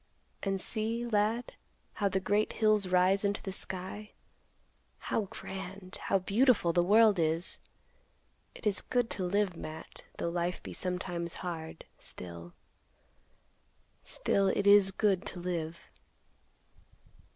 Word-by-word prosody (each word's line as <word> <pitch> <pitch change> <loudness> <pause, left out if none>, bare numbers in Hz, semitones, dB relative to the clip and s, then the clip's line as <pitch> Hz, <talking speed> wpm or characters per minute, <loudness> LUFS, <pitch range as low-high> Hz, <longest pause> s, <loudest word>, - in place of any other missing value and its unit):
And 195 -1 -1
see, 225 +4 +1
lad, 225 +1 0 0.4
how 200 -2 0
the 190 0 0
great 205 +3 +1
hills 215 -3 +3
rise 185 +2 +4
into 200 +1 0
the 195 - -4
sky. 190 +3 -4 0.8
How 215 - -1
grand, 190 0 -8
how - - +3
beautiful 200 -1 +3
the 175 - +4
world 210 +1 +5
is! 165 +2 +1 1.0
It - - -11
is 205 -2 +1
good 245 -2 0
to 190 - -2
live, 195 0 +1
Matt, 155 0 -8
though 170 - -1
life 175 +1 -2
be - - -7
sometimes 180 -2 -3
hard, 160 -2 -6
still—still 85 -1 -8 2.0
it 200 +1 +1
is 200 -1 +7
good 195 -1 +1
to 180 - -7
live." 170 -2 -3
190 Hz, 120 wpm, -31 LUFS, 175-210 Hz, 2.0 s, is